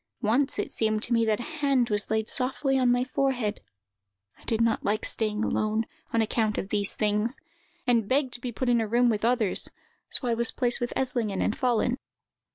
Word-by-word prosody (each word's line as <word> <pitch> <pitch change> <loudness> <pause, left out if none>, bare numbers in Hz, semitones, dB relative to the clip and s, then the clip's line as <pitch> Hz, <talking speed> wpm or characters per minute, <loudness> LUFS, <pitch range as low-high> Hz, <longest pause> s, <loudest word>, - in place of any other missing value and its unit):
Once 250 +6 +1
it - - -3
seemed 215 -1 0
to 240 - +1
me 230 -1 +3
that 220 0 +1
a - - -4 0.2
hand 265 -5 +2
was 205 0 +1
laid 220 0 0
softly 265 +1 +1
on 250 -1 +3
my 245 0 +2
forehead. 255 -5 -1 0.8
I - - -20
did 225 - 0
not 230 -1 +1
like 210 +2 0
staying 215 -1 0
alone, 215 +1 0 0.3
on 230 -1 +2
account 215 -1 0
of 190 - -3
these 205 -1 -1
things, 210 +4 0 0.5
and 235 -5 +2
begged 265 -1 +1
to 240 - +1
be 250 - -4
put 255 +3 -3
into 235 -2 +3
a - - -6
room 240 +3 +3
with 210 -1 -2
others; 235 -4 +2 0.4
so 250 - -1
I 235 - +2
was 235 0 +3
placed 245 -2 +2
with 240 - -2
Eslingen 240 -7 -1
and 215 - 0
Follen. 245 0 +1
230 Hz, 205 wpm, -27 LUFS, 215-250 Hz, 0.8 s, me